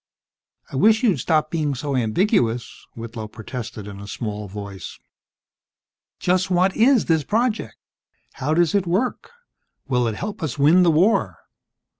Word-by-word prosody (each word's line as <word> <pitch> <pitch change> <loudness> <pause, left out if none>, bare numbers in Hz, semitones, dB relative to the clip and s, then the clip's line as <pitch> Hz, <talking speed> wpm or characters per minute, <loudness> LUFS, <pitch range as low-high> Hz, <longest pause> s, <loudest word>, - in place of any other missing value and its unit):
"I 135 - -4
wish 220 - +4
you'd 200 - +3
stop 155 +4 +1
being 150 -4 -1
so 140 +2 -3
ambiguous," 125 - 0
Whitlow 115 -1 -7
protested 110 -1 -7
in 100 -1 -9
a 100 - -9
small 105 0 -5
voice. 100 -1 -8 1.2
"Just 185 +1 +1
what 185 +1 +2
is 245 +1 +4
this 160 -3 +2
project? 225 - -1 0.7
How 150 +4 +1
does 170 -1 +2
it 200 -3 +1
work? 200 +9 -1 0.6
Will 125 -2 +1
it 110 - -2
help 205 - -6
us 150 -6 -3
win 155 +6 +5
the 175 - +5
war?" 180 +8 +2
155 Hz, 145 wpm, -22 LUFS, 115-185 Hz, 1.2 s, win